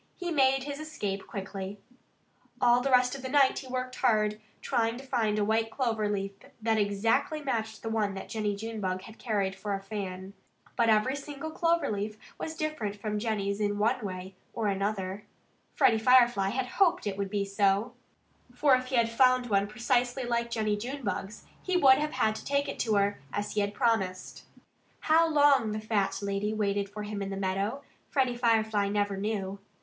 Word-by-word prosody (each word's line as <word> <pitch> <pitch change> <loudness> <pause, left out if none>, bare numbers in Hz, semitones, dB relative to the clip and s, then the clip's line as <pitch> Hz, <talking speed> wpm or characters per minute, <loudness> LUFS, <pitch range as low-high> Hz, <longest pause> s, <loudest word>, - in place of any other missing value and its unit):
he 350 -2 -4
made 270 -3 +3
his 285 +1 -5
escape 205 -11 -4
quickly. 195 0 -6 0.8
All 245 0 +4
the 275 - -1
rest 250 -1 +4
of 275 - -6
the 260 - -5
night 275 -1 +4
he 265 - -10
worked 255 0 -4
hard, 215 -1 +2 0.2
trying 230 0 0
to 270 - -10
find 225 -5 0
a 210 - +2
white 225 +1 +1
clover 225 -4 -1
leaf 195 -1 -2 0.3
that 220 0 +1
exactly 225 +9 +1
matched 220 -5 -3
the 225 - -3
one 210 -3 0
that 195 - -7
Jennie 210 -1 -2
Junebug 200 -4 -4
had 225 - -13
carried 200 -5 -1
for 200 0 -3
a - - -4
fan. 195 -2 -6 0.4
But 230 -2 +3
every 220 +5 +3
single 290 +2 -6
clover 335 -2 +1
leaf 210 +1 -3 0.2
was 320 - -4
different 305 -11 -3
from 210 0 -3
Jennie's 205 -2 -1
in 205 -1 0
one 230 +4 +1
way 185 -1 -6 0.2
or 225 - -2
another. 195 -1 -2 0.5
Freddie 225 - +4
Firefly 240 -4 +5
had 255 +5 -1
hoped 360 +5 +2
that 205 - -1
it 195 - -9
would 200 -1 -1
be 200 0 -1
so. 200 +2 +1 0.6
For 275 +2 +4
if 255 0 +3
he 260 - -2
had 235 -1 +4
found 250 0 +3
one 200 0 +3
precisely 245 +4 0
like 235 -1 -1
Jennie 215 -3 0
Junebug's, 230 -4 -5 0.2
he 370 -1 0
would 265 -5 +6
have 300 +1 -2
had 215 - +2
to - - -9
take 280 +1 0
it - - -5
to 220 -3 +1
her, 200 0 +1
as 205 0 -3
he 210 - 0
had 200 0 -2
promised. 195 -6 -1 0.6
How 325 +1 +4
long 280 -7 +4
the 215 - -2
fat 210 -3 0
lady 200 +2 -1
waited 200 -1 0
for 210 +1 -6
him 205 -1 -5
in 195 - -3
the 195 - -4
meadow, 195 +7 -2 0.3
Freddie 260 -3 +1
Firefly 220 -4 +2
never 205 -1 0
knew. 200 -1 -3
220 Hz, 190 wpm, -29 LUFS, 200-255 Hz, 0.8 s, would